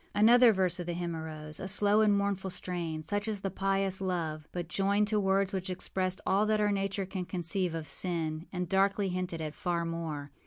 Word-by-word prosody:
Another 235 +3 +7
verse 185 -3 +1
of 175 - -5
the 175 - -1
hymn 170 -1 -3
arose, 155 -1 -6
a 190 - -4
slow 205 +2 +4
and 210 -2 +4
mournful 200 -1 -1
strain, 170 -4 -3
such 205 +5 -2
as 210 -3 -3
the 195 - -2
pious 195 0 0
love, 160 -5 -2
but 175 -2 -4
joined 200 +3 +2
to 215 -1 +2
words 195 0 +1
which 190 -1 -2
expressed 185 0 -1
all 200 +3 +2
that 215 0 +2
our 210 -1 +2
nature 195 0 -1
can 185 -1 -4
conceive 175 0 -2
of 160 -2 -5
sin, 160 +1 -1
and 180 -1 -3
darkly 195 +2 +2
hinted 180 -2 -2
at 155 -1 -4
far 170 -1 -2
more. 160 -4 -4
185 Hz, 205 wpm, -30 LUFS, 170-200 Hz, -, Another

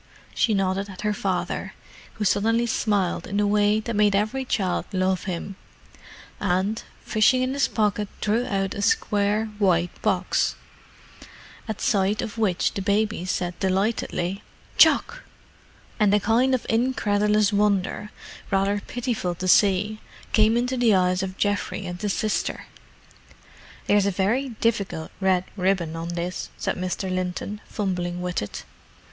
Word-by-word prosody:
She 220 -3 +2
nodded 195 +1 0
at 185 - -9
her 210 0 0
father, 190 -3 -2 0.4
who 215 - -3
suddenly 225 +5 +2
smiled 205 -5 0
in 200 - -3
the 205 - +3
way 205 +1 +3
that 230 0 -4
made 205 -1 +3
every 215 +6 0
child 190 -7 -1
love 185 -1 0
him, 185 +1 -5 0.8
and, 195 +4 0 0.2
fishing 220 +4 +3
in 255 +1 -1
his 280 - +2
pocket 210 -1 0
drew 225 +4 0
out 195 -3 -1
a 200 - -4
square 210 - +1
white 175 -3 +2
box—at 220 -2 -4
sight 200 +1 +1
of 225 -1 -6
which 190 -5 +1
the 195 - -3
baby 205 -1 0
said 180 -1 -1
delightedly, 195 -1 -1 0.3
"Choc!" 485 +2 +4 0.8
and 210 -2 +4
a - - +4
kind 240 +6 +3
of 250 - -4
incredulous 210 -3 +2
wonder, 205 0 +1 0.4
rather 200 +1 +1
pitiful 230 -8 -2
to 185 +2 -4
see, 205 +3 +3 0.3
came 220 +1 +4
into 250 +2 0
the 235 -4 +4
eyes 180 0 +2
of 190 0 -5
Geoffrey 205 -1 -1
and 180 0 -6
his 205 -2 0
sister. 215 -1 -2 1.2
"There's 205 -1 +3
a - - +3
very 210 +8 0
difficult 215 -8 -2
red 190 -2 +2
ribbon 185 -4 0
on 165 +1 -5
this," 175 +1 -4
said - - -2
Mr. 185 +1 -3
Linton, 185 +3 -3
fumbling 180 -4 -2
with 180 0 -2
it. 105 - -6
205 Hz, 140 wpm, -24 LUFS, 185-215 Hz, 1.2 s, Choc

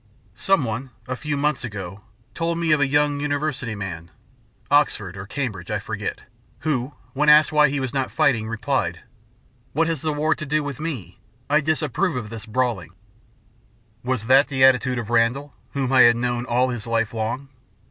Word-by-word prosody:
Someone, 130 - 0 0.2
a 130 - -2
few 150 +2 -3
months 145 -2 0
ago, 100 -4 -6 0.3
told 165 0 -1
me 170 -2 0
of 150 - +4
a 140 - +4
young 145 +1 +2
university 145 -5 -2
man 90 -4 -6 0.6
Oxford 105 -10 +2
or 95 0 -8
Cambridge, 105 -10 -4
I - - 0
forget - - -5 0.4
who, 140 -3 -1 0.2
when 150 +2 +2
asked 150 +1 +7
why 150 -1 +5
he 140 +1 -1
was 130 -1 -3
not 135 -2 -1
fighting, 125 -8 +1
replied; 130 +4 -1 0.7
"What 165 +3 +2
has 160 -4 -1
the 155 - -1
war 150 +2 +1
to 155 - -7
do 155 +1 0
with 140 -2 -5
me? 130 - -5 0.3
I 150 +1 +5
disapprove 155 +3 0
of 115 -4 -5
this 115 -1 -8
brawling." 110 -7 -1 1.1
Was 125 -3 -2
that 135 +4 +5
the 130 -2 +1
attitude 130 -1 +4
of 115 -1 -4
Randall, 120 +5 +1 0.2
whom 135 -2 -1
I 130 - +7
had 120 0 +7
known 120 0 -1
all 125 +1 +2
his 120 -3 -5
life 115 -1 0
long? 120 +5 -3
130 Hz, 180 wpm, -23 LUFS, 115-150 Hz, 1.1 s, asked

